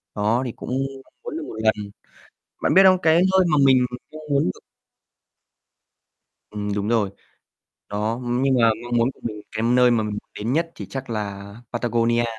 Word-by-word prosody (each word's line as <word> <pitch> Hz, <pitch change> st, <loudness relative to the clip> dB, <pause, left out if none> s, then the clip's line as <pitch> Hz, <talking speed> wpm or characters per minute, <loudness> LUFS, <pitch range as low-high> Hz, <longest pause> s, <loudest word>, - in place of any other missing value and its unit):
Đó 110 Hz, +4 st, +1 dB
thì 120 Hz, -, -3 dB
cũng -, -, -8 dB, 0.5 s
muốn 475 Hz, -9 st, -5 dB
được 330 Hz, -, -5 dB
1 -, -, -8 dB
lần. 105 Hz, -2 st, 0 dB, 0.7 s
Bạn -, -, +2 dB
biết 190 Hz, -, +8 dB
không? 185 Hz, -1 st, +6 dB
Cái 160 Hz, -2 st, +5 dB
nơi 190 Hz, +1 st, +4 dB
mà 150 Hz, -, +3 dB
mình 130 Hz, -2 st, +5 dB, 0.3 s
mong 155 Hz, -, -9 dB
muốn 140 Hz, 0 st, +3 dB
được 90 Hz, -, -3 dB, 1.9 s
Ừm, 105 Hz, -1 st, -4 dB
đúng 100 Hz, +1 st, -2 dB
rồi. 110 Hz, -4 st, +1 dB, 0.8 s
Đó, 105 Hz, +2 st, -1 dB
ừm, 120 Hz, +1 st, -2 dB
nhưng 135 Hz, -1 st, +3 dB
mà 115 Hz, -1 st, +5 dB
mong 120 Hz, 0 st, -1 dB
muốn 115 Hz, +2 st, +2 dB
của -, -, -25 dB
mình, 105 Hz, -2 st, -5 dB
cái 110 Hz, -, -3 dB
nơi 125 Hz, +1 st, +4 dB
mà 115 Hz, -2 st, +2 dB
mình 105 Hz, -1 st, -3 dB
muốn 105 Hz, -, -7 dB
đến 110 Hz, +4 st, -2 dB
nhất 165 Hz, +3 st, 0 dB
thì -, -, -8 dB
chắc 135 Hz, -2 st, -6 dB
là 100 Hz, -2 st, -5 dB, 0.2 s
Patagonia. 120 Hz, 0 st, +1 dB
120 Hz, 190 wpm, -23 LUFS, 105-135 Hz, 1.9 s, biết